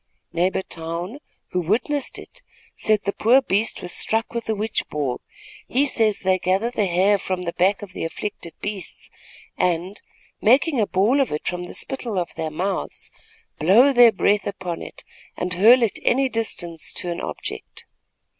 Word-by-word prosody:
Neighbor 180 +3 +1
Towne, 170 - -5 0.3
who 180 - 0
witnessed 250 - 0
it, - - -10 0.3
said 215 -1 +1
the 200 - -1
poor 240 +5 +5
beast 220 -4 -1
was 175 - -4
struck 225 +2 0
with 235 -1 -4
a 220 - +1
witch 215 +2 -1
ball. 140 -5 -2 0.5
He 270 +4 +2
says 220 -6 +2
they 185 -1 +2
gather 190 +7 +1
the 215 -5 0
hair 190 +3 +3
from 185 -1 -3
the 170 -1 -3
back 195 +3 +2
of 190 -2 -10
the - - -5
afflicted 170 0 -5
beasts 200 -4 -5 0.5
and, 180 +3 0 0.4
making 260 +3 +4
a 205 - +1
ball 220 +9 +3
of 270 - 0
it 150 - -3
from 180 0 -2
the - - -6
spittle 240 -6 -2
of 175 -2 -2
their 160 - -3
mouths, 185 +6 -3 0.5
blow 225 - +6
their 240 -2 +8
breath 205 -1 +1
upon 185 -4 -4
it - - -10 0.3
and 180 0 -2
hurl 230 +8 +6
it 225 - 0
any 265 +2 +3
distance 175 -8 -2
to 175 - -2
an 170 - -4
object. - - -6
200 Hz, 175 wpm, -22 LUFS, 180-230 Hz, 0.5 s, their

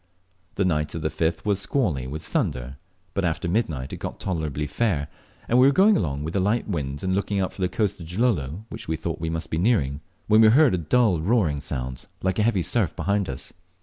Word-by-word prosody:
The 100 - +1
night 75 -4 0
of 80 - -4
the 80 - 0
5th 80 0 -1
was 100 -2 +1
squally, 90 - 0
with 75 +4 -5
thunder, 65 +2 -2 0.4
but 100 - -1
after 85 +2 -1
midnight 80 - -1
it - - -4
got - - -6
tolerably 80 -5 -2
fair, 75 -2 -1 0.4
and 120 - +4
we 130 - +7
were - - +6
going 200 +7 +5
along 70 - -1
with 80 +4 -4
a - - +3
light 105 +5 +1
wind 70 -7 -3
and 95 0 0
looking 100 +1 0
out 95 - -1
for - - -9
the 90 - +1
coast 105 -1 -1
of 85 - -8
Gilolo, 90 - -1
which - - -8
we 80 - 0
thought 80 +1 -4
we 80 - -1
must 80 0 -4
be 80 - 0
nearing, 75 - +1 0.2
when 110 +1 +5
we 110 - +8
heard 135 +3 +6
a 90 - +1
dull 95 +2 +2
roaring 85 -7 +1
sound, 65 -2 -4 0.2
like 95 +1 0
a - - +4
heavy 105 -5 +2
surf, 105 -6 0
behind 100 -1 0
us. 65 - -7
90 Hz, 230 wpm, -24 LUFS, 75-105 Hz, 0.4 s, we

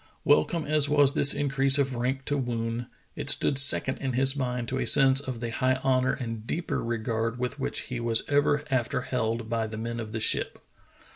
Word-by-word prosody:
Wel 75 - +4
come 165 -3 -4
as 150 -1 +3
was 145 -2 +3
this 145 -2 +6
increase 135 -1 +1
of 135 -2 0
rank 130 +3 -3
to 145 - -1
Woon, 120 -2 -3 0.3
it - - -4
stood 135 - +3
second 135 -1 +3
in 130 -2 -3
his 135 +2 +3
mind 125 -3 -3
to 130 - -3
a - - -2
sense 135 -1 +6
of 130 -4 -6
the 120 -1 -4
high 130 +3 0
honor 130 0 +1
and 115 -4 -6
deeper 170 +1 -3
regard 115 0 -3
with 125 +3 -4
which - - -3
he 125 -2 -6
was 115 -1 +1
ever 145 0 +1
after 125 -1 -1
held 115 -2 -3
by 115 -1 -2
the 110 0 -8
men 115 +1 -5
of 110 -2 -7
the 110 - -4
ship. - - -1
130 Hz, 210 wpm, -26 LUFS, 115-135 Hz, 0.3 s, this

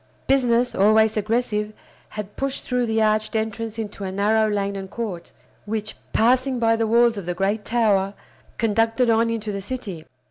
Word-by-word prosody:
Business, 245 -2 +2
always 215 +2 +4
aggressive, 215 -1 -1 0.4
had 210 -1 -7
pushed 275 0 -3
through 250 -1 0
the 220 0 +1
arched 215 0 +1
entrance 220 0 -3
into 210 -2 -5
a 190 - -3
narrow 215 +3 +2
lane 200 -1 -1
and 195 -1 -6
court, 205 -7 -5 0.4
which, 215 0 -3 0.2
passing 255 +3 +2
by 225 -1 +3
the 225 0 0
walls 235 0 +4
of 180 - -9
the 175 - -2
great 200 +3 0
tower, 205 -4 +1 0.4
conducted 225 +2 +2
on 230 +1 +3
into 220 -2 -3
the 200 -1 -4
city. 195 -7 -6
220 Hz, 170 wpm, -23 LUFS, 205-230 Hz, 0.4 s, always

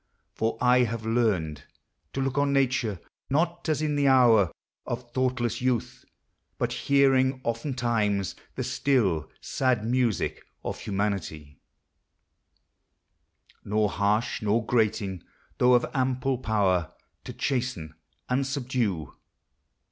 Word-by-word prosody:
For 115 0 -1
I 125 0 +4
have 115 -1 -4
learned 95 - 0 0.5
To 135 - -2
look 135 -1 -1
on 140 0 +2
nature, 125 -7 +1 0.3
not 165 +4 0
as 155 0 +1
in 150 -1 0
the 145 -1 +2
hour 115 -8 +5 0.3
Of 120 0 -5
thoughtless 125 -2 -1
youth; 125 -2 -1 0.5
but - - -1
hearing 135 -1 +3
oftentimes 115 -5 -1 0.2
The - - -2
still, 100 - +1
sad 125 -5 0
music 120 -3 0 0.2
of - - -4
humanity, 95 -8 -3 2.0
Nor 105 0 +1
harsh 105 +5 0
nor 110 +2 +1
grating, 110 -6 0 0.4
though 125 0 +6
of 120 - +3
ample 130 -1 0
power 95 -8 +1 0.3
To - - -6
chasten 125 - -2 0.3
and 130 +2 0
subdue. 120 - -2
120 Hz, 110 wpm, -27 LUFS, 105-130 Hz, 2.0 s, though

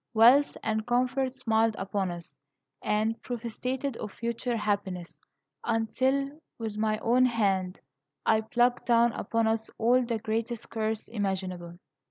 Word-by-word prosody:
Wealth 245 +6 +6
and 220 -1 0
comfort 255 +2 +1
smiled 225 -3 +1
upon 195 -1 -1
us, 170 -5 -9 0.4
and 215 +2 0
prophesied 250 +2 -3
of 210 - -5
future 235 +2 -2
happiness, 200 -5 -2 0.4
until, 265 +6 0 0.2
with 220 -2 -4
my 215 0 +1
own 250 +2 +4
hand, 195 -6 0 0.5
I 220 0 +4
plucked 240 +3 +1
down 235 0 +5
upon 230 +1 -1
us 220 0 0
all 245 +3 +4
the 235 -1 -1
greatest 225 +1 -3
curse 220 -1 -2
imaginable. 185 -5 -3
225 Hz, 130 wpm, -28 LUFS, 210-245 Hz, 0.5 s, Wealth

